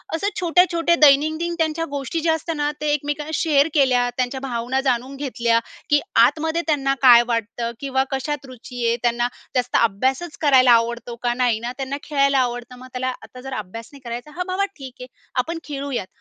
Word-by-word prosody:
असं 390 +5 -1
छोट्या-छोट्या 345 -1 +3
दैनंदिन 310 +4 +4
त्यांच्या 325 0 0
गोष्टी 285 +4 -3
ज्या 325 0 +2
असतात 320 +1 -3
ना, 295 0 0
ते 300 -1 +1
एकमेकांना 295 +1 -3
शेअर 295 -3 +3
केल्या, 255 -4 +3
त्यांच्या 255 +1 -1
भावना 245 +2 -1
जाणून 255 +2 -2
घेतल्या, 240 -4 0 0.3
की 295 -1 +5 0.3
आतमध्ये 320 +1 0
त्यांना 275 -3 +1
काय 240 -3 +8
वाटतं? 230 0 -2
किंवा 265 -1 0
कशात 275 +1 -3
रुची 250 -1 -7
आहे? 230 - +2
त्यांना 240 0 +1 0.3
जास्त 250 -1 0
अभ्यासच 260 - 0
करायला 260 -4 +5
आवडतो 235 +1 +1
का? 240 -1 +1
नाही 245 -3 +1
ना, 235 +2 -4
त्यांना 275 0 -3
खेळायला 275 -2 +2
आवडतं. 245 0 -2
मग 255 - -11
त्याला 255 0 -2
आता 250 - -12
जर 270 +1 -7
अभ्यास 215 +3 -8
नाही 280 - -13
करायचा, 240 +5 -6
हा 360 - 0
बाबा 375 +2 0
ठीक 265 -3 -10
आहे, 250 - -7 0.4
आपण 330 +3 -5
खेळूयात, 280 -8 -4
270 Hz, 180 wpm, -21 LUFS, 245-300 Hz, 0.4 s, काय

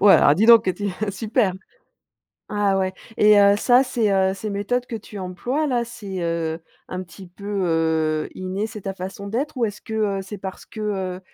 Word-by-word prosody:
Ouais, 200 0 +8
alors 145 - +6
dis 205 +7 +2
donc 230 -2 +8
heu, - - +3
tu, 205 +2 -3 0.2
super! 215 +1 0 1.0
Ah 205 -2 +1
ouais, 185 0 0 0.2
et 210 0 +6
heu, 200 0 +6
ça 245 +4 +5
ces, 240 -5 0
heu, 190 -1 +3
ces 210 +2 -5
méthodes 240 +5 -1
que 230 - -4
tu 210 -1 -10
emploies 240 +11 -2
là 245 -4 +1
c'est, 205 -5 -7
heu, 165 -1 -2 0.3
un 185 0 -4
petit 185 +2 -12
peu, 180 +3 -15 0.2
heu, 160 -2 +1
inné, 185 +3 -3
c'est 220 -2 -9
ta 195 0 -4
façon 190 +2 -7
d'être? 265 +8 -2
Ou 240 - +2
est-ce 205 -1 -7
que, 220 - -9 0.3
heu, - - -6
c'est 200 +2 -8
parce 190 0 -7
que, 220 - -10
heu, 190 -3 -2
200 Hz, 205 wpm, -22 LUFS, 185-220 Hz, 1.0 s, Ouais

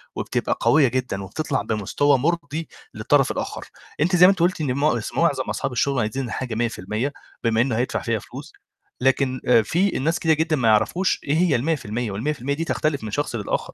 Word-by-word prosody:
وبتبقى - - -2
قوية 140 -3 +5
جدًا 125 -6 -2
وبتطلّع 145 +7 -2
بمستوى 130 +7 +1
مُرضي 160 +1 -2 0.3
للطرف - - +2
الآخر، - - -5 0.4
أنتِ 180 +3 +2
زي 180 +1 +8
ما - - +8
أنتِ 190 - -3
قُلتِ 175 -1 +1
إن 130 -4 0
مع 140 -3 +1 0.2
معظم - - +2
أصحاب - - -2
الشغل 135 +1 0
عايزين 125 +5 -2
الحاجة 120 0 -4
100% 115 +3 -2 0.3
بما 115 0 +2
إنه 125 -3 0
هيدفع 125 - -1
فيها 115 -2 -1
فلوس، - - -11 0.5
لكن 135 -1 +1
آآ 115 -2 +6
في 175 - +1
ناس 165 +5 0
كتيرة 160 -1 +3
جدًا 160 +1 +1
ما 120 -5 0
يعرفوش 170 - +2
إيه 145 +3 0
هي 170 -4 +3
ال100% 120 -5 -2
وال100% 140 +5 -2
دي 165 - -2
تختلف 150 -5 -1
من 110 - -5
شخص 145 0 -2
للآخر، 105 - -3
135 Hz, 190 wpm, -23 LUFS, 115-155 Hz, 0.5 s, زي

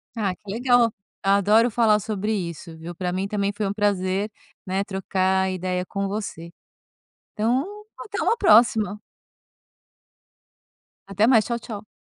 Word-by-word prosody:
Ah, 200 -5 -1
que 200 0 -10
legal. 245 +1 +3 0.3
Adoro 200 +4 +4
falar 220 -2 +3
sobre 210 0 -3
isso, 170 -4 -4
viu? 170 +2 -8
Pra 180 +1 -2
mim, 190 +2 -2
também, 200 -1 -1
foi 205 -1 -1
um 195 - -2
prazer, 200 -1 0 0.4
né. 190 +1 -1
Trocar 190 -1 0
ideia 185 0 -2
com 195 +1 -3
você, 195 -5 -5 0.9
então, 235 +5 +1 0.4
até 420 -2 -5
uma 460 - +2
próxima. 220 - +4 2.1
Até 200 +2 +2
mais, 230 -3 +5
tchau, 235 - -2
tchau. 215 -2 -8
200 Hz, 135 wpm, -24 LUFS, 190-220 Hz, 2.1 s, mais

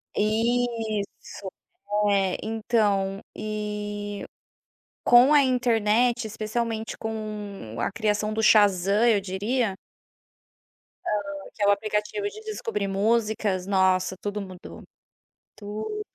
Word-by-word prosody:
Isso, 220 -3 -1 0.6
é. 195 -2 +2
Então 210 -3 0 0.2
e 210 -1 -4 0.8
com 245 +4 +7
a 290 - +7
internet, 240 -1 +2
especialmente 220 +1 -3
com 210 - -6
a - - 0
criação 210 0 0
do 220 +1 -1
Shazam 205 0 +5
eu 215 -4 +4
diria 200 +3 -1 1.3
Hã, - - 0 0.4
que 210 - -3
é - - +4
o - - +7
aplicativo 210 - -1
de 430 +1 -11
descobrir 435 - -3
músicas, 210 -2 +1
nossa 190 -1 +2
tudo 205 0 -3
mudou, 185 -2 -10 0.7
tudo 210 +1 -6
mudou. 425 0 -4
210 Hz, 105 wpm, -26 LUFS, 200-230 Hz, 1.3 s, com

